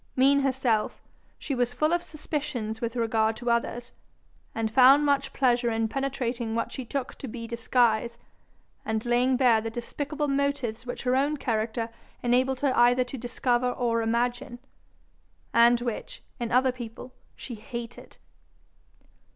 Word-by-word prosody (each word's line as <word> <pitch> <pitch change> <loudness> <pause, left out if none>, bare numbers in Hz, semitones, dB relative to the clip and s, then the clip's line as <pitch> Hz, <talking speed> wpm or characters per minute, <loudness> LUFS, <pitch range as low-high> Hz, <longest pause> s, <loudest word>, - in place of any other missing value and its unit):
Mean 275 +2 +5
herself, 260 -5 0 0.3
she 280 - -4
was 245 -1 -1
full 305 +5 +2
of 345 - +2
suspicions 290 -9 -4
with 235 0 -3
regard 225 -2 +1
to 240 +1 -2
others, 235 +1 -1 0.6
and 225 -1 -1
found 270 +4 +7
much 280 -1 +1
pleasure 245 -2 +2
in 225 0 0
penetrating 245 -3 -2
what 230 - -2
she 260 - -5
took 260 +2 -4
to 270 - -6
be 230 0 -6
disguise, 235 0 +1 0.7
and 220 0 -2
laying 245 +2 +2
bare 240 -4 +4
the 225 - -3
despicable 290 +6 -4
motives 275 -4 -1
which 245 - -5
her 250 0 +2
own 285 +3 +1
character 225 -2 -2 0.3
enabled 255 +2 +2
her 275 -3 +2
either 245 +1 +5
to 250 +2 -8
discover 245 0 0
or 235 -2 0
imagine, 240 +2 -1 1.0
and 235 +1 +5
which, 240 -3 -5 0.2
in 235 -1 -3
other 255 +1 +4
people, 245 0 -9 0.2
she 250 - -8
hated. 235 +2 -8
245 Hz, 145 wpm, -27 LUFS, 230-265 Hz, 1.0 s, found